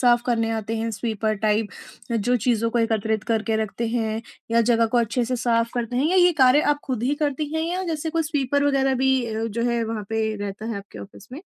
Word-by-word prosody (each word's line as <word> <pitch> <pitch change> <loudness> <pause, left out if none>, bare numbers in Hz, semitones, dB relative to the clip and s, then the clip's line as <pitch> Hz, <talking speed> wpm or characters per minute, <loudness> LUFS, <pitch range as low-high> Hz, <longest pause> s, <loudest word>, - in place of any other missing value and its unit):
साफ़ 240 -1 +4
करने 230 -2 +1
आते 225 0 -2
हैं 225 +1 -2
स्वीपर 220 0 -2
टाइप 215 0 +2 0.4
जो 240 +3 +1
चीज़ों 230 -1 +1
को 240 - 0
एकत्रित 220 -1 0
करके 220 0 0
रखते 230 +2 -4
हैं 225 -1 -1 0.3
या 230 0 +4
जगह 230 -1 +4
को 240 - +5
अच्छे 235 +1 0
से 250 +1 -2
साफ़ 230 -1 +1
करते 240 0 -2
हैं 275 +4 +2
या 375 - +2
ये 355 -1 +6
कार्य 260 +4 +6
आप 290 - -16
खुद 255 -5 -3
ही 265 +4 +1
करती 290 +1 -2
हैं 320 - 0
या 365 +1 -2
जैसे 315 +1 -3
कोई 330 0 0
स्वीपर 285 -2 0
वग़ैरह 270 -2 +2
भी 265 -1 +2
अ, 220 0 -3
जो 230 +1 -3
है 235 -1 0
वहाँ 220 -2 -4
पे 220 -1 -1
रहता 205 +1 -6
है, 230 - -3
आपके 200 0 -10
ऑफिस 200 0 -12
में? 295 +7 -8
230 Hz, 235 wpm, -23 LUFS, 220-260 Hz, 0.4 s, ये